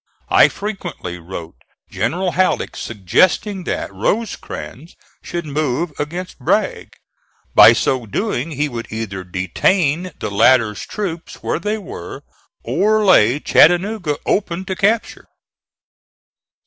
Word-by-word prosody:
I - - +7
frequently 195 - -6
wrote 85 -1 -8 0.4
General 170 - -1
Halleck 185 +2 0
suggesting 180 - +1
that - - -3
Rosecrans 185 - -4 0.3
should 170 -1 -5
move 150 +2 -1
against 175 +5 -5
Bragg. 125 - -1 0.6
By - - +9
so 125 -4 0
doing 165 - -2
he 150 -1 -1
would 120 -4 -6
either 105 -4 -5
detain 145 - 0
the 105 - -4
latter's 105 0 +3
troops 175 -5 -6
where - - -1
they 210 +1 -2
were 195 -3 -9 0.4
or 215 +1 +2
lay 135 - +5
Chattanooga 175 -1 +3
open 185 -2 -1
to 190 - -3
capture. 215 +4 0
160 Hz, 110 wpm, -19 LUFS, 115-190 Hz, 0.6 s, By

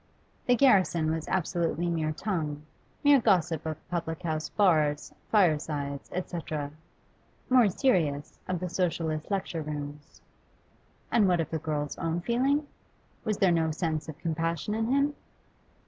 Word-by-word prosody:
The 245 - +5
garrison 185 - +4
was 160 -1 -3
absolutely 175 -1 0
mere 160 -2 0
tongue, 155 -5 -3 0.4
mere 285 -2 +6
gossip 175 -7 +2
of 155 -1 -6
public 165 -2 -3
house 155 -2 -2
bars, 155 -7 +2 0.2
firesides, 150 -7 +1
etc. 160 -5 -4 0.8
more 250 -5 +6
serious, 160 - 0
of 185 -1 -1
the 180 - -3
Socialist 165 -3 -1
lecture 190 -5 -2
rooms. 145 -1 -7 0.9
And 215 -4 +4
what 175 -2 +3
of 165 - -2
the 160 - -1
girl's 150 -1 -3
own 165 +1 -1
feeling? 270 - +1 0.6
Was 215 -3 0
there 190 -2 +4
no 165 -1 +2
sense 160 -1 -2
of 155 - -7
compassion 165 +4 -2
in 225 +1 0
him? 280 +3 +2
165 Hz, 135 wpm, -28 LUFS, 155-195 Hz, 0.9 s, mere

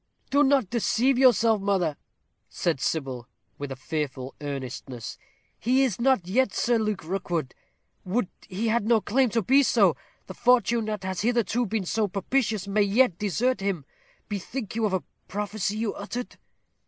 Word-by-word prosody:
"Do 285 +2 +5
not 270 -8 +3
deceive 245 +2 +2
yourself, 230 -4 +5
mother," 190 -6 +1 0.5
said 165 -6 -1
Sybil, 130 -6 -2 0.3
with 145 -1 -5
a - - -3
fearful 130 -1 -4
earnestness. 130 -4 -6 0.4
"He 255 +4 +3
is 235 -4 -1
not 255 -8 +3
yet 240 +2 +1
Sir 240 -1 +2
Luke 215 -4 -1
Rookwood; 170 -5 -2 0.5
would 195 +3 0 0.2
he 210 +4 -1
had 220 -1 +1
no 230 -1 +5
claim 245 +5 +2
to 230 0 0
be 270 +8 +5
so! 275 - +4 0.3
The - - -8
fortune 235 -2 +3
that 210 -3 -3
has 185 -1 -3
hitherto 235 +1 +1
been 210 -1 -2
so 215 +4 0
propitious 210 +1 -1
may 205 +1 +2
yet 205 -1 +3
desert 215 +4 +1
him. 195 -7 -2 0.4
Bethink 210 +3 -5
you 225 -1 +2
of 195 - -4
a 185 -4 0 0.2
prophecy 210 0 -2
you 220 -1 -1
uttered." 240 +5 -6
210 Hz, 160 wpm, -26 LUFS, 180-235 Hz, 0.5 s, Do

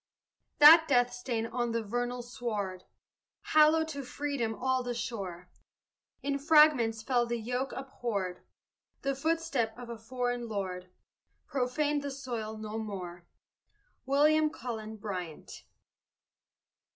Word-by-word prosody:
That 320 +2 +9
death 245 -3 +3
stain 245 -2 -2
on 235 0 -2
the 230 -1 -1
vernal 245 +3 -2
sward 210 -6 -4 0.7
Hallowed 310 +1 +6
to 280 -2 -5
freedom 255 -4 -3
all 260 +1 0
the 245 -1 -3
shore; 190 -7 -5 0.7
In 280 0 -1
fragments 280 -8 +5
fell 240 -1 +1
the 235 0 -1
yoke 250 +4 -2
abhorred 215 -9 -4 0.6
The 275 0 +1
footstep 275 -6 -1
of 245 -1 -9
a 230 - -7
foreign 245 +1 -3
lord 185 -3 -4 0.6
Profaned 290 +3 0
the 285 - -4
soil 240 -6 -5
no 215 0 -5
more. 180 -5 -6 0.8
WILLIAM 305 +3 +4
CULLEN 220 -6 -6
BRYANT. 180 -7 -7
245 Hz, 115 wpm, -30 LUFS, 220-275 Hz, 0.8 s, That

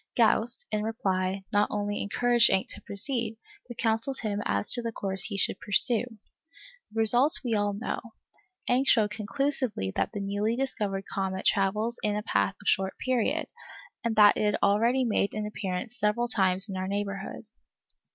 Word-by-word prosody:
Gauss, 230 0 +4
in 215 -1 -1
reply, 195 -3 -2
not 205 0 +2
only 205 0 -3
encouraged 240 +3 +2
Encke 190 - 0
to - - -4
proceed, 225 +2 -4 0.3
but 240 - -10
counselled 225 +4 -1
him 210 -2 -2
as 100 0 -1
to 240 - +3
the 230 -1 -4
course 195 -3 -1
he 200 - -5
should - - 0
pursue. 220 +3 +4 0.9
The 220 - -11
result 245 +7 +5
we 235 - -1
all 205 -1 0
know. 205 +4 -4 0.7
Encke 255 +2 +1
showed 215 -5 +3
conclusively 230 - -1
that - - -1
the 205 - -5
newly 205 +3 -1
discovered 210 -7 -3
comet 190 -1 -3
travels 210 +4 0
in 210 -1 -1
a 210 - -3
path 195 -3 0
of 200 - -12
short 190 0 +1
period, 255 -4 -1 0.6
and 230 -1 -1
that 210 -1 +6
it - - -1
had 210 - +1
already 230 +6 +2
made 215 -4 0
its 215 0 -3
appearance 210 +3 -5
several 210 +3 0
times 190 -3 +4
in 195 -2 -5
our 185 0 -3
neighbourhood. 200 +1 -5
210 Hz, 170 wpm, -27 LUFS, 200-235 Hz, 0.9 s, that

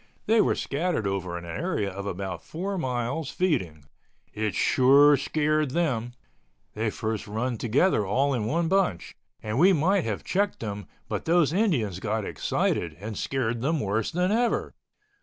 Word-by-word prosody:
They 220 0 +4
were - - +2
scattered 155 - -1
over 95 -3 -2
an 85 - -8
area 100 - -2
of 100 +2 -6
about 95 -2 -4
four 190 +5 -4
miles 130 -1 -2
feeding. 90 - -1 0.5
It 105 -1 -2
sure 140 +3 +5
scared 155 +1 0
them. 125 -7 -1 0.6
They 110 +1 -1
first 110 0 -3
run 115 +3 -2
together 120 - +2
all 135 +9 +1
in 115 -5 -1
one 165 +7 0
bunch, 185 - 0 0.3
and 110 +3 -2
we 190 +4 +6
might 180 +4 +2
have 110 -3 -3
checked 200 +2 0
them 105 -3 -5 0.2
but - - -4
those 165 -2 +3
Indians 140 - +1
got 110 +1 -2
excited 80 -3 -1
and 105 +2 -6
scared 120 0 -2
them 155 +4 0
worse 105 0 -1
than 180 +3 0
ever. 235 +2 0
125 Hz, 160 wpm, -26 LUFS, 105-165 Hz, 0.6 s, we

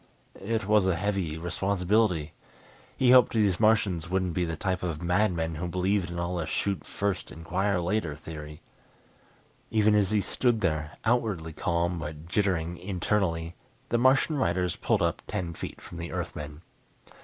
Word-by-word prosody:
It 110 +1 -1
was 105 -2 +4
a 95 - +2
heavy 95 -4 -1
responsibility 90 -1 +1 0.6
he 125 -1 +4
hoped 125 -1 +7
these 105 -5 +2
Martians 100 -7 +2
wouldn't 95 -2 0
be 90 +1 0
the 80 -1 -3
type 90 +3 -2
of 85 -4 -3
madmen 90 -3 +1
who 85 +3 -3
believed 95 +1 0
in 85 - -6
the 85 -1 -2
"shoot 100 -1 -1
first, 100 -2 -2
inquire 95 +4 -1
later" 85 -3 -1
theory. 75 -1 -9 1.1
Even 110 -1 +3
as 105 -3 +3
he 110 - +2
stood 120 +1 +1
there, 75 -5 -1
outwardly 110 -9 0
calm 85 +2 0
but 75 0 -7
jittering 90 -3 0
internally, 90 -3 -1 0.4
the 120 - +2
Martian 135 +4 +4
riders 90 -7 0
pulled - - +1
up - - 0
ten 85 -2 -3
feet - - -7
from 85 - -10
the 85 -2 -5
Earthmen. 75 +3 -5
90 Hz, 155 wpm, -28 LUFS, 85-105 Hz, 1.1 s, hoped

